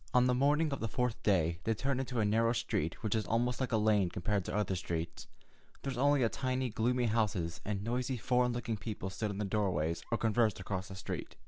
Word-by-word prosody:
On 125 0 +6
the 125 - +3
morning 145 +4 +3
of 140 - -3
the 115 - -1
fourth 125 +1 -1
day 85 -6 +2
they 115 - +1
turned 135 +4 0
into 130 -2 -2
a 110 - +3
narrow 115 +3 +3
street 115 -9 -2
which 110 - 0
was 110 -2 0
almost 120 +2 +1
like 130 - -1
a 115 - +3
lane 105 -4 +3
compared 100 +2 -1
to - - -3
other 105 -2 0
streets. 85 -2 -4 0.6
There 135 - -2
were 125 - -3
only 140 -3 +4
tiny, 130 0 -1
gloomy 120 +3 +1
houses, 105 -7 0
and 100 -1 -2
noisy, 125 +3 -1
foreign 125 +2 +2
looking 120 -2 -2
people 95 -2 -5
stood 105 +3 -2
in 100 - -4
the 105 - -1
doorways 90 -6 0
or 115 - +2
conversed 110 -2 +2
across 95 0 -3
the 95 - -8
street. 95 - -5
110 Hz, 225 wpm, -33 LUFS, 95-125 Hz, 0.6 s, On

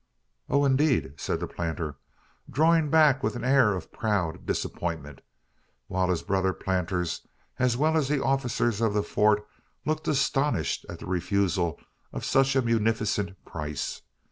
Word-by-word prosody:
"Oh, 140 0 +3
indeed!" 135 - +2
said - - -2
the - - -2
planter, 80 -3 -4 0.5
drawing 160 +2 +3
back 150 -3 +5
with 135 - -1
an 120 - -5
air 125 -6 +4
of 90 - -7
proud 100 -7 -1
disappointment; 80 -6 -3 0.6
while 90 +6 0
his 90 -3 0
brother 95 -1 +1
planters, 90 -2 -2 0.3
as 125 -2 +2
well 155 +3 +2
as 155 -4 +2
the 145 0 +1
officers 120 -4 0
of 110 -2 +1
the 105 - +2
Fort, 105 0 +2 0.4
looked 155 0 -1
astonished 135 - +1
at - - -6
the - - -9
refusal 90 -1 0 0.3
of - - -5
such 135 0 +3
a 130 - +3
munificent 110 -4 0
price. 75 -2 -4
105 Hz, 145 wpm, -27 LUFS, 90-135 Hz, 0.6 s, back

